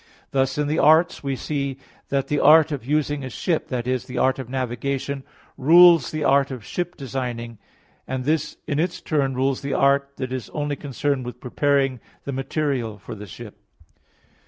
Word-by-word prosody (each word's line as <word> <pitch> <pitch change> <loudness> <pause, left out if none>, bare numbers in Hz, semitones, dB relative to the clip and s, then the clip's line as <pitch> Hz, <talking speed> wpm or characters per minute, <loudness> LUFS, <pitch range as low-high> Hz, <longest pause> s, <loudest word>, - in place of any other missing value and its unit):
Thus 135 0 +1
in 150 - +1
the 155 +2 0
arts 160 +4 +4
we 135 -1 -1
see 140 -1 -3 0.3
that 135 -1 0
the 145 0 0
art 155 +1 +6
of 140 -4 -3
using 145 +1 0
a 130 - -5
ship, 160 +6 -1
i.e. 125 +1 0
the 125 - -8
art 130 +1 +2
of 130 -2 -6
navigation, 135 +2 -3 0.3
rules 165 -2 +7
the 155 -1 -3
art 140 -1 +3
of 125 -6 -7
ship 175 0 -4
designing; 120 -4 -5 0.5
and 130 -1 -3
this 155 +1 0
in 145 -2 -1
its 175 +2 -1
turn 140 -4 0
rules 135 +1 0
the 140 0 -2
art 140 0 +2
that 130 -1 -4
is 130 -3 -5
only 145 -1 -1
concerned 140 -1 -2
with 125 0 -7
preparing 135 0 +1 0.2
the 140 - -4
material 135 -5 -2
for 105 - -9
the 105 -1 -9
ship. 85 - -11
140 Hz, 180 wpm, -23 LUFS, 130-150 Hz, 0.5 s, rules